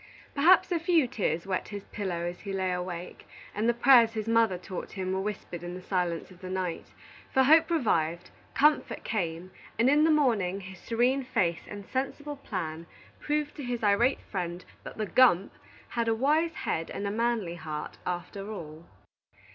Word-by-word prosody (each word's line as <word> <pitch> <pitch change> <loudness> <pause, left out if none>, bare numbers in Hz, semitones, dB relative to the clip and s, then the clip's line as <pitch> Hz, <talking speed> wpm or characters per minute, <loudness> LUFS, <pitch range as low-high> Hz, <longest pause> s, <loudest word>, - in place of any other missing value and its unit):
Perhaps 345 +7 +5
a 345 - +2
few 330 -5 +3
tears 185 -8 -1
wet 190 -1 -2
his 205 -1 -7
pillow 185 -5 -4
as 175 0 -4
he 200 - -6
lay 190 -1 -1
awake, 180 -1 -5 0.3
and 215 +3 +1
the - - +4
prayers 235 -2 +6
his 220 -1 -3
mother 225 -4 +3
taught 180 0 -7
him 185 -1 -3
were 190 - 0
whispered 195 -4 -5
in 175 0 -6
the 185 - -8
silence 180 -2 -2
of 180 - -16
the 185 - -7
night; 185 -2 -3 0.4
for 265 - +4
hope 315 +6 +6
revived, 175 - 0 0.2
comfort 300 +1 +2
came, 180 -4 -3 0.3
and 240 +4 +4
in 295 +1 +5
the 320 - +4
morning 220 - +2
his 190 -1 -10
serene 250 +4 +1
face 180 -10 -1
and 205 -1 -8
sensible 285 +4 -3
plan 170 - -5 0.3
proved 300 0 -1
to 290 - -7
his 245 -2 -3
irate 225 +6 +3
friend 180 -2 -5 0.2
that - - -9
the 215 - -1
"gump" 205 -5 +4 0.4
had 235 -1 -1
a 225 - +2
wise 310 +7 +2
head 165 0 -2
and 200 - -4
a 200 - -1
manly 225 -5 0
heart, 155 -3 -6
after 195 +3 -4
all. 160 -5 -8
200 Hz, 180 wpm, -28 LUFS, 180-255 Hz, 0.4 s, prayers